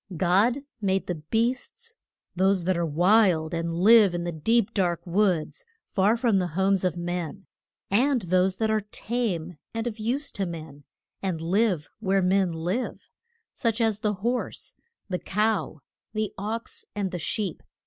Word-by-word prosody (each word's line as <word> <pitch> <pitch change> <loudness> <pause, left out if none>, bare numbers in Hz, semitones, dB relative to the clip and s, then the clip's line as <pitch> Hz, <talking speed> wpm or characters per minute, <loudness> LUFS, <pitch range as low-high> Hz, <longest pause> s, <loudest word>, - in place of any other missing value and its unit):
God 200 - +3 0.2
made 195 -1 +1
the 180 - -2 0.2
beasts: 245 - -1 0.4
those 190 0 +2
that 185 +1 +1
are 170 - 0
wild 175 0 +3
and 165 0 -1
live 200 +2 +6
in 175 - -2
the 175 - -2
deep, 210 +7 +1
dark 175 -3 0
woods, 185 - 0 0.2
far 205 +4 +2
from 230 -5 +2
the 180 - 0
homes 195 0 +3
of 180 -2 0
men; 175 +1 -4 0.5
and 250 +3 +3
those 185 +1 +2
that 220 +2 0
are 215 0 +2
tame 205 -6 -3 0.2
and 225 0 -2
of 230 -2 -4
use 265 +7 -1
to 195 -2 -2
men, 155 -4 -8 0.4
and 185 -4 -2
live 180 -1 +1
where 195 0 +1
men 185 0 +3
live 175 +10 -3 0.4
such 230 -3 0
as 220 -3 +1
the 210 -1 0
horse, 245 +1 -2 0.3
the 180 -2 -2
cow, 210 -7 -1 0.3
the 215 -1 -2
ox 230 - -5
and 200 -3 -1
the 180 - -4
sheep. 190 +1 -2
195 Hz, 160 wpm, -26 LUFS, 175-225 Hz, 0.5 s, live